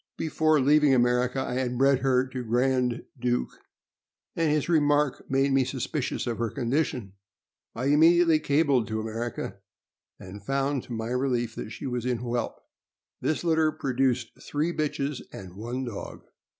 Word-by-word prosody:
Before 155 -1 +2
leaving 145 0 +4
America 125 +1 +2
I 130 - -3
had 125 -1 -1
bred 135 0 +4
her 130 -1 +2
to 130 -1 -5
Grand 125 +1 +1
Duke, 125 0 0 0.8
and 165 -2 +1
his 150 -1 +1
remark 145 -4 +2
made 135 +1 +2
me 135 0 +4
suspicious 130 +2 -3
of 120 -2 -3
her 115 -1 0
condition. 125 -5 -2 0.6
I 120 +3 -3
immediately 165 +3 +5
cabled 140 -6 +2
to 110 +1 -2
America, 115 +2 -4 0.6
and 95 +2 -10
found, 135 +3 0
to 120 - -7
my 110 0 -3
relief, 125 -2 0
that - - -6
she 110 - -8
was 125 -2 -2
in 125 -1 0
whelp. 120 0 -3 0.6
This 155 - -1
litter 160 -2 +3
produced 130 -5 0
three 155 +4 -1
bitches 145 -2 -2
and 95 -2 -10
one 120 +5 -4
dog. 115 -4 -7
130 Hz, 150 wpm, -27 LUFS, 120-145 Hz, 0.8 s, immediately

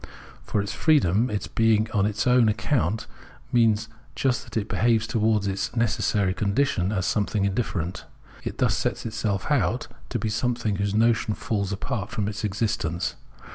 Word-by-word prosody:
For - - -2
its 100 - -4
freedom, 125 - +3
its 105 -2 -2
being 110 -1 +2
on 100 -1 +2
its 105 +1 -1
own 125 -3 +5
account, 110 - 0 0.5
means 115 -3 +3 0.3
just 125 +1 +1
that - - -6
it 105 -1 -1
behaves 115 -1 +2
towards 110 -2 +1
its 100 +4 -2
necessary 105 -4 +1
condition 105 0 +1
as 95 -4 -1
something 105 -1 0
indifferent. 95 -4 -2 0.4
It - - -5
thus - - +2
sets - - -2
itself 105 -4 -2
out - - +1 0.2
to - - -1
be - - -2
something 115 -2 -1
whose 100 +1 -1
notion 110 -1 +2
falls 105 -5 -2
apart 105 +2 -3
from 110 -4 -2
its 105 0 -4
existence. 105 -5 -1
110 Hz, 160 wpm, -25 LUFS, 100-115 Hz, 0.5 s, own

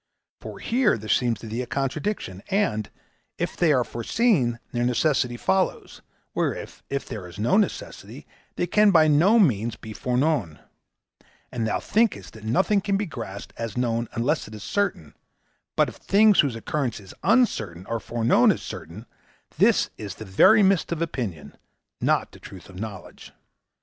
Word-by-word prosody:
For - - -9
here 240 - +1
there 110 0 -9
seems 115 0 +1
to 115 - -8
thee 115 +3 -3
a 125 - -5
contradiction, 135 - -3
and, 185 - 0 0.5
if - - -3
they 170 -3 +3
are 130 -4 +3
foreseen, 125 - +1
their 120 0 -1
necessity 125 0 +1
follows; 95 -4 -1 0.3
whereas - - -3
if 140 -1 -3
there 105 -7 -6
is 85 - -12
no 110 +4 +1
necessity, 210 0 -2 0.3
they - - 0
can 210 +4 +4
by 160 -5 +5
no 170 +10 +5
means 120 - +2
be 110 0 -10
foreknown; 125 - 0 0.9
and 115 -2 -2
thou 105 - 0
thinkest 225 0 0
that 110 - -13
nothing 190 - +2
can 200 0 0
be 205 - -1
grasped 115 - -8
as 115 -1 -5
known 115 -1 0
unless 140 +7 0
it 110 - -10
is 105 - -9
certain, 195 - -2 0.6
but - - +3
if - - -9
things 210 0 +4
whose 140 -6 +3
occurrence 125 +2 -2
is 95 -2 -13
uncertain 100 - +1
are 115 0 -3
foreknown 115 +1 +3
as - - -4
certain, 95 +8 -8 0.5
this - - +3
is 100 -5 -7
the 110 - -9
very 205 - +5
mist 190 -4 +2
of 170 - -2
opinion, 115 - -5 0.5
not - - +1
the - - -15
truth 95 0 -12
of 90 -1 -11
knowledge. 110 -1 -9
120 Hz, 165 wpm, -24 LUFS, 110-175 Hz, 0.9 s, by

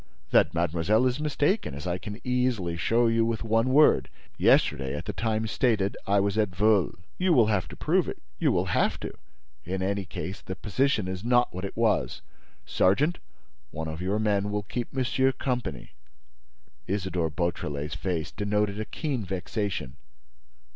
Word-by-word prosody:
"That - - +5
mademoiselle 85 +7 +2
is 125 +2 +1
mistaken, 150 - 0
as 75 - -7
I 90 0 -1
can 105 +3 -7
easily 125 -9 0
show 115 +7 +2
you 115 0 +3
with 115 0 -1
one 115 +2 +2
word. 150 +4 +5 0.3
Yesterday, 65 0 +3
at - - -6
the - - -3
time 110 -1 -1
stated, 110 -3 +1
I 100 +1 +4
was 100 +2 +1
at 105 -2 +2
Veules." 100 +1 +2 0.2
"You 180 -1 +3
will 120 -7 +6
have 95 -4 0
to - - -10
prove - - +1
it, - - -5 0.2
you - - +3
will - - +1
have - - +1
to. - - -5 0.5
In 95 +2 -3
any 100 0 -1
case, 90 +3 -6
the 95 - -6
position 110 0 0
is 95 0 -5
not 120 +1 +3
what 95 +2 -4
it 100 - -7
was. 105 - +1 0.4
Sergeant, 140 - +2 0.5
one 80 +1 -5
of 80 +2 -5
your 95 +3 0
men 105 -2 +1
will 105 0 -2
keep 120 +4 -4
monsieur 130 0 +1
company." 125 - -3 1.0
Isidore 90 -4 -1
Beautrelet's 75 -2 -3
face 85 -4 -3
denoted 105 0 -1
a 110 - -2
keen 140 -5 -3
vexation. 95 - -3
105 Hz, 170 wpm, -27 LUFS, 90-120 Hz, 1.0 s, will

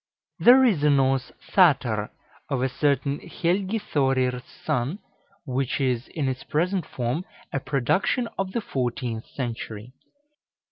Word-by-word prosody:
There 260 +2 +7
is 200 - +3
a 150 - +5
Norse 135 -2 +2 0.2
Tháttr 130 - +4 0.4
of 135 -3 0
a 130 - +1
certain 140 +1 0
Helgi 190 +5 -1
Thorir's 130 - 0 0.2
son, 125 +9 0 0.5
which 130 +1 -1
is, 130 -2 0
in 150 -5 -2
its 130 -1 -3
present 180 +3 0
form, 125 +7 -2 0.3
a 135 - +1
production 140 - +1
of 190 -1 -2
the 235 - 0
fourteenth 120 - -3
century. 115 -2 -6
135 Hz, 130 wpm, -25 LUFS, 125-170 Hz, 0.5 s, There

